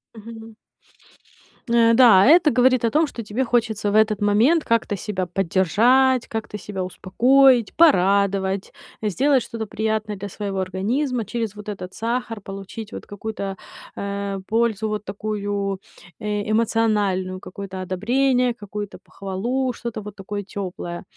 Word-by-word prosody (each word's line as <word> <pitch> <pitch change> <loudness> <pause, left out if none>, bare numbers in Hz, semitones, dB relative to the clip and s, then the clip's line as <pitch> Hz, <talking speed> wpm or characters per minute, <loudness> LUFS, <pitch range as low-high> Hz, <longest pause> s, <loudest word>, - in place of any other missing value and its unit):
Мгм. 225 0 -11 1.1
Н-да, 230 -3 +6
это 320 +2 +6
говорит 255 -1 +3
о - - +3
том, 315 +5 +3
что 235 -4 -7
тебе 215 +5 -2
хочется 225 -4 0
в - - -1
этот 215 -1 +3
момент 230 +11 +3
как-то 230 -3 +1
себя 190 -2 -3
поддержать, 220 +9 +2
как-то 220 -2 -5
себя 195 -1 -5
успокоить, 240 +6 +3
порадовать, 195 - +3 0.3
сделать 255 +5 +2
что-то 225 -2 -6
приятное 215 0 -2
для 200 +1 -6
своего 200 0 -4
организма. 225 +8 -1
Через 215 0 -4
вот 210 0 -8
этот 190 -2 -7
сахар 230 -1 -3
получить 195 +3 -8
вот - - -8
какую-то, 200 -1 -5 0.4
э, 200 0 -4
пользу, 225 -1 +1
вот 210 0 -4
такую, 200 -1 -3 0.4
э, 210 0 -3
эмоциональную, 210 -5 +1
какое-то 190 0 -8
одобрение, 245 +7 +1
какую-то 205 -1 -7
похвалу, 235 +7 -3
что-то 235 -2 -6
вот 205 -1 -9
такое 205 +1 -5
тёплое. 180 -3 -6
210 Hz, 130 wpm, -22 LUFS, 195-235 Hz, 1.1 s, Н-да